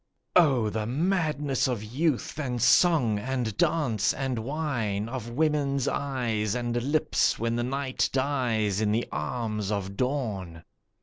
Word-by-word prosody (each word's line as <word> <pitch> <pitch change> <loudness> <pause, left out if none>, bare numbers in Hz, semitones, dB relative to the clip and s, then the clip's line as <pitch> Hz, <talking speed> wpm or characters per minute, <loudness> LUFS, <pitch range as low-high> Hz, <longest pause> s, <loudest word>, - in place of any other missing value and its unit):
Oh 130 -11 +4
the 110 0 -2
madness 150 -2 0
of 120 -5 -2
youth 145 +5 -1
and 125 -5 -2
song 125 - +4
and 125 -2 -2
dance 120 -7 +1
and 130 -3 -2
wine, 115 -6 -2
Of 120 -1 -5
woman's 140 0 +1
eyes 120 -6 -1
and 120 -1 -2
lips, 145 +5 +1
when 115 0 -1
the 120 - 0
night 130 +1 -1
dies 120 -7 0
in 105 -1 +2
the 115 +3 0
arms 105 +6 -3
of 100 -1 -3
dawn! 105 - -2
125 Hz, 135 wpm, -27 LUFS, 110-140 Hz, -, Oh